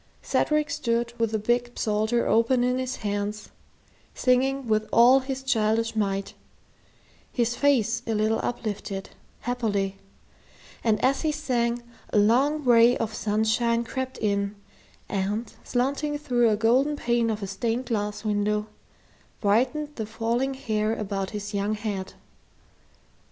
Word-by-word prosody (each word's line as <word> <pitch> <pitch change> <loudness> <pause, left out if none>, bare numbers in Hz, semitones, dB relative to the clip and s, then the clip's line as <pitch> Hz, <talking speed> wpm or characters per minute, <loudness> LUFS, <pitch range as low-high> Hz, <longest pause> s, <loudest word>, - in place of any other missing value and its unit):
Cedric 300 -1 +1
stood 235 -2 -1
with 230 -1 +2
the 220 - -1
big 240 +3 0
psalter 220 +2 +1
open 235 +2 +3
in 250 +1 +1
his 255 0 -2
hands, 205 +1 -3 0.7
singing 265 +1 +1
with 215 0 +1
all 250 +3 +7
his 265 0 -5
childish 225 -3 +1
might, 195 -2 -1 1.0
his 240 -1 0
face 240 -5 +2
a 225 - 0
little 215 +1 +1
uplifted, 205 -4 -4 0.3
happily; 205 -6 -1 0.9
and 220 -2 +2
as 270 +1 +2
he 315 - +1
sang, 240 -5 -1 0.3
a - - +1
long 265 +9 +3
ray 240 -1 +6
of 220 -1 -3
sunshine 220 +3 +1
crept 260 +2 -4
in 200 -1 -1 0.5
and, 205 +3 -2
slanting 280 +4 -1
through 245 -5 +2
a 210 - +2
golden 255 +7 +3
pane 235 -4 +1
of 215 -2 -2
a - - -3
stained 225 +6 -2
glass 210 -2 -3
window, 210 0 0 0.7
brightened 260 +8 +1
the 220 -2 -3
falling 235 +4 -1
hair 220 -4 -1
about 195 -3 -3
his 205 0 -6
young 205 +1 0
head. 205 -3 -4
230 Hz, 135 wpm, -26 LUFS, 210-250 Hz, 1.0 s, all